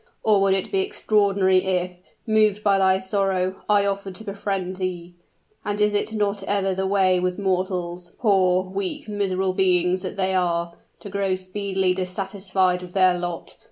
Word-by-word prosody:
or 210 -2 +4
would 195 -1 +3
it 190 - -3
be 390 - +1
extraordinary 200 - +2
if, 185 -1 -1 0.3
moved 215 -2 +2
by 200 -2 +3
thy 190 0 +4
sorrow, 190 -1 -1
I 205 -1 +4
offered 200 -1 -3
to 220 - -6
befriend 195 -3 -3
thee? 180 -2 -4 0.5
And 205 0 -3
is 210 0 +3
it 205 - 0
not 205 -2 -1
ever 195 -1 0
the 190 +1 -1
way 190 -2 +3
with 180 0 -1
mortals 180 -2 -2
poor, 185 -4 +3
weak, 190 +2 -3
miserable 190 -2 -1
beings 185 -1 +2
that 185 +1 -6
they 190 -1 +1
are 170 -2 0 0.3
to 205 - -8
grow 195 -1 0
speedily 190 0 -1
dissatisfied 185 0 -1
with 180 -1 -10
their 185 -2 +4
lot? 175 -1 -6
190 Hz, 165 wpm, -23 LUFS, 185-200 Hz, 0.5 s, or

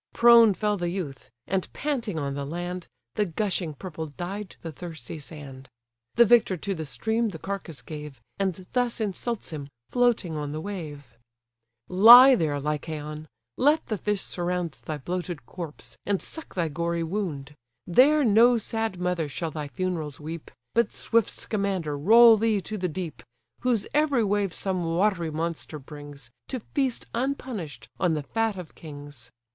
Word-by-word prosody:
Prone 235 -3 +7
fell 210 0 0
the 175 -2 -1
youth; 165 -8 -5 0.2
and 190 -1 -2
panting 245 - -2
on 140 -2 -2
the 140 0 -3
land, 175 +4 -5 0.3
The 210 - +1
gushing 180 -3 -2
purple 160 0 -6
dyed 180 +7 -6
the 165 - -5
thirsty 160 -3 -8
sand. 140 -3 -10 0.5
The 235 - +7
victor 220 -4 +4
to 195 +4 -3
the 160 -3 -5
stream 225 +8 0
the 175 - -7
carcase 170 -7 -5
gave, 150 -4 -8 0.2
And 190 -1 -1
thus 245 -2 +1
insults 220 +1 -3
him, 145 -3 -6 0.2
floating 240 -9 +2
on 145 -1 -3
the 155 - -3
wave: 150 - -7 0.7
"Lie 240 +8 +10
there, 155 - +1
Lycaon! 150 +1 -4 0.3
let 300 +4 +3
the 215 - -2
fish 210 0 0
surround 175 -1 -2
Thy 155 - -3
bloated 175 -1 -4
corpse, 165 -1 -8
and 200 -2 0
suck 320 - -10
thy 170 -3 +1
gory 170 +2 -1
wound: 160 -6 -3 0.3
There 285 - +5
no 235 +2 +6
sad 225 -3 -2
mother 180 -4 -1
shall 160 +4 -4
thy 150 -1 -4
funerals 160 -2 -3
weep, 160 +1 -7 0.2
But 235 0 +2
swift 230 -2 +1
Scamander 195 -8 -2
roll 225 +9 +7
thee 220 -1 +2
to 215 - -5
the 180 -3 -1
deep, 165 0 -5 0.4
Whose 240 -5 +1
every 290 -5 +3
wave 200 -2 +1
some 185 0 -2
watery 170 0 +1
monster 160 0 -4
brings, 145 -3 -11 0.2
To 255 - -3
feast 260 +1 -2
unpunish'd 245 - -3
on 175 -4 +2
the 150 - -3
fat 225 +6 -1
of 180 -4 -8
kings. 145 -6 -11
180 Hz, 160 wpm, -26 LUFS, 155-215 Hz, 0.7 s, Lie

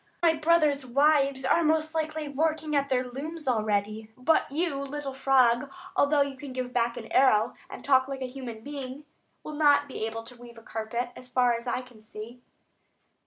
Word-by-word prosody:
My 330 -1 +5
brothers' 305 -3 +2
wives 275 +1 +2
are 335 - +3
most 315 0 +1
likely 315 -1 -2
working 310 +1 -1
at 280 0 +1
their 255 -1 +1
looms 300 +5 -6
already. 215 -2 -1
But 270 +5 +2
you, 310 -1 -1
little 280 0 -5
frog, 265 -1 +3 0.2
although 285 0 +3
you 280 -1 -6
can 265 0 -9
give 255 -1 -4
back 235 -1 0
an 225 - -6
arrow, 240 -5 +4 0.2
and - - -9
talk 260 -1 +4
like 270 -1 -5
a - - -1
human 250 -3 -7
being, 280 0 -7 0.4
will 305 - -7
not 290 -1 +4
be 260 - -5
able 225 0 -6
to 245 +2 -11
weave 235 -1 -12
a 225 - -13
carpet, 225 +3 -3
as 255 - -11
far 245 -1 +3
as 235 +1 -5
I 245 - -1
can 250 -4 -16
see." 220 +3 -10
270 Hz, 190 wpm, -27 LUFS, 240-295 Hz, 0.4 s, My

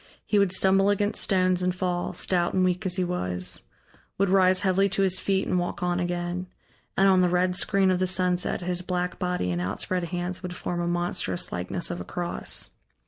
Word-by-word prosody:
He 210 - +2
would 200 -2 +3
stumble 195 +1 +3
against 205 +1 +1
stones 185 -2 +2
and 180 0 0
fall, 180 -1 -2
stout 175 -1 0
and 185 -1 +3
weak 185 +2 0
as 180 - -1
he 185 - +1
was; 90 - -1 0.5
would 195 0 +2
rise 185 -1 +5
heavily 195 0 +2
to 195 +1 +1
his 185 -1 +2
feet 195 -1 0
and 180 - +1
walk 175 0 -3
on 175 0 0
again; 175 +1 -3 0.5
and 195 - +5
on 190 -1 +5
the 180 - +3
red 180 +1 +1
screen 195 0 +2
of 180 - +1
the 185 - +1
sunset 180 0 +1
his 180 0 -2
black 180 0 -3
body 180 - -1
and 85 0 -2
outspread 170 - -2
hands 180 +1 -3
would 180 -2 -6
form 175 -1 -3
a 170 - -1
monstrous 175 - -1
likeness 90 - -2
of 175 - -4
a - - -4
cross. 175 -1 -3
180 Hz, 205 wpm, -26 LUFS, 175-185 Hz, 0.5 s, rise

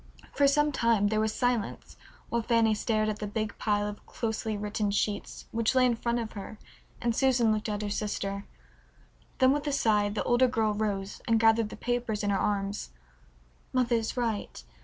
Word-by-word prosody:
For 285 - +4
some 295 +1 +3
time 230 -6 +2
there 215 0 +1
was 220 0 +1
silence 245 -1 -2 0.3
while 235 - 0
Fanny 230 -1 +3
stared 215 0 0
at 215 0 -2
the 210 - -3
big 215 0 -3
pile 205 -1 +1
of 205 0 -7
closely 220 -2 -3
written 210 0 -1
sheets 205 0 -2
which 230 +2 +1
lay 255 -1 +5
in 245 -2 +2
front 235 +1 -1
of 230 -2 -3
her 210 +1 -8 0.4
and 235 -1 0
Susan 245 -4 +3
looked 215 +1 -2
at 210 0 -2
her 205 - -2
sister. 200 -1 -3 0.9
Then 260 0 +5
with 290 +1 -1
a - - +1
sigh 210 -6 +2
the 205 0 -2
older 245 +1 +4
girl 220 -3 +1
rose 205 -2 -3
and 225 -1 +3
gathered 225 -1 +4
the - - -8
papers 240 -3 -2
in 205 - +1
her 195 - +1
arms. 200 - -1 0.8
"Mother 245 -2 +2
is 225 +2 -3
right. 225 - -2
220 Hz, 190 wpm, -29 LUFS, 210-235 Hz, 0.9 s, lay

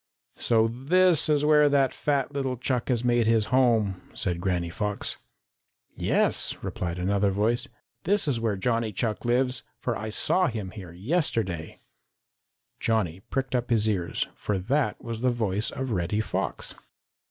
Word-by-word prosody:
"So 115 -1 +3
this 160 +8 +2
is 150 -1 +3
where 150 -1 +5
that 140 -2 +3
fat 140 -2 0
little 135 -3 -2
Chuck 125 0 -1
has 120 -2 +1
made 120 -2 +2
his 115 -2 +3
home," 110 -8 +3
said 90 -2 -2
Granny 90 -3 -1
Fox. 105 +2 -2 0.8
"Yes," - - +2
replied 85 -1 -3
another 100 +2 +1
voice, 105 +5 0 0.3
"this 200 -1 +2
is 130 -5 +1
where 110 -3 0
Johnny 115 +2 0
Chuck 110 +4 -2
lives, 125 0 +1 0.2
for 120 - -2
I 110 0 -4
saw 180 - +2
him 105 -5 -4
here 95 -5 -9
yesterday." 95 - -1 1.0
Johnny 95 -7 0
pricked 135 -1 -2
up 125 -1 0
his 110 -2 +2
ears, 95 -5 0
for 105 - -2
that 120 +5 0
was 115 -1 -5
the 125 - +3
voice 110 -3 0
of 130 -1 -4
Reddy 90 +1 0
Fox. 110 - -2
115 Hz, 155 wpm, -26 LUFS, 100-130 Hz, 1.0 s, where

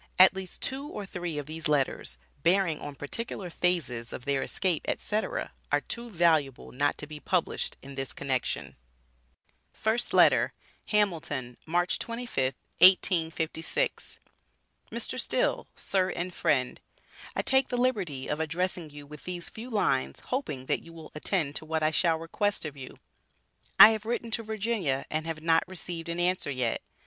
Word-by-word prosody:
At 185 +1 +9
least 190 -1 -7
two 275 +2 -2
or 210 -8 -6
three 175 -5 -4
of 145 - -3
these 155 +2 -3
letters, 135 - 0 0.2
bearing 170 -1 +3
on 145 -1 -7
particular 180 +5 -5
phases 135 -11 0
of 125 - -7
their 140 -1 +1
escape, 180 -5 0
etc., 220 - -1 0.2
are - - +3
too 235 0 -5
valuable 160 - +2
not 145 +3 +1
to - - -5
be 150 0 -8
published 180 +2 -1
in 140 +1 -9
this 135 -1 -4
connection: 130 -3 -2 1.0
FIRST 225 +2 0
LETTER. - - +5 0.3
HAMILTON, 160 - 0
March 175 +2 +1
25th, 230 - -2 0.2
1856. 165 - +3 0.7
Mr. - - -1
Still: - - 0
Sir 190 -1 +1
and 180 0 -3
Friend 130 -7 +1 0.5
I - - 0
take 265 0 +4
the 245 - -2
liberty 195 - 0
of 150 - -2
addressing 170 +1 -2
you 145 0 -10
with 150 0 -12
these 175 -1 -4
few 230 +3 -8
lines 70 - 0
hoping 150 - -2
that - - 0
you 165 - -13
will 165 -1 -11
attend 150 -2 0
to - - -8
what 160 0 -1
I 155 - +3
shall 165 0 +2
request 185 +4 -1
of 150 -2 -5
you. 130 -2 -9 0.8
I 220 - +12
have 220 0 -3
written 235 0 -2
to 230 - +2
Virginia 215 - -1
and 155 +1 -1
have 160 -1 -4
not 165 0 +4
received 175 -2 -6
an 170 +1 -2
answer 180 -3 +1
yet. 125 -4 -1
165 Hz, 160 wpm, -29 LUFS, 145-195 Hz, 1.0 s, I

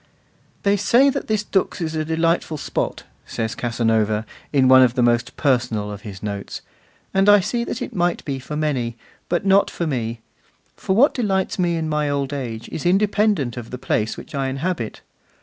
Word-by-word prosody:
'They 200 0 +3
say 235 +7 +4
that 275 - -4
this 215 -1 0
Dux 195 -2 0
is 160 -2 -2
a 155 -1 -1
delightful 165 0 0
spot,' - - -3 0.2
says 110 -1 -3
Casanova 110 -2 0 0.3
in 135 -3 +4
one 130 0 +8
of 125 -1 +4
the 125 - +2
most 120 +1 +1
personal 120 -7 0
of 100 -1 -8
his 100 -3 -9
notes, 100 -1 -5 0.5
'and 195 +1 +4
I 205 0 +8
see 235 +5 -1
that 245 - -4
it - - -7
might 175 -1 0
be 135 -2 -3
for 150 +3 -7
many; 130 -7 -1 0.3
but 175 +3 0
not 195 +1 +4
for 170 - -3
me, 115 -6 -3 0.5
for 190 - -1
what 270 +8 +5
delights 195 -6 -1
me 175 -2 +2
in 160 -1 -2
my 150 -1 0
old 140 -1 -1
age 120 -5 -5
is 155 - -5
independent 195 - +2
of 120 -1 -7
the 125 - -6
place 110 -4 -1
which - - -11
I 135 -2 -1
inhabit. 135 -3 -3
145 Hz, 190 wpm, -21 LUFS, 120-190 Hz, 0.5 s, one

